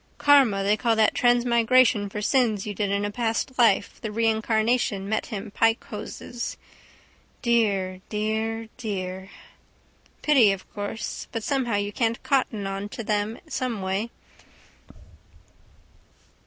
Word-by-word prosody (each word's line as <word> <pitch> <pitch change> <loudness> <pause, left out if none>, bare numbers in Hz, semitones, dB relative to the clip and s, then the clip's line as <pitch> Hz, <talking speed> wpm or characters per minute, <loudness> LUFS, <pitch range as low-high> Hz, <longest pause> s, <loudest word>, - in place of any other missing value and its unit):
Karma 265 -9 +4
they 205 +2 +3
call 230 +1 +1
that 220 -1 +3
transmigration 240 -3 +3
for 210 +1 -5
sins 225 -4 +2
you 210 - -4
did 205 0 -1
in 200 +1 0
a 205 - -3
past 235 +3 -2
life 215 -4 +3
the 220 - -4
reincarnation 220 -1 +1
met 220 +1 -1
him 210 -2 -6
pike 225 +2 +2
hoses. 230 +3 -6 0.9
Dear, 200 -6 +1
dear, 220 +1 -2
dear. 190 -4 -5 0.9
Pity, 265 -9 +5
of 195 -1 -5
course: 205 +2 -5
but 225 -2 -4
somehow 260 -5 0
you 205 0 -2
can't 230 0 -1
cotton 255 -7 0
on 195 +1 -4
to 230 - -6
them 210 +1 -1
someway. 225 -7 -2
220 Hz, 125 wpm, -25 LUFS, 205-235 Hz, 0.9 s, Pity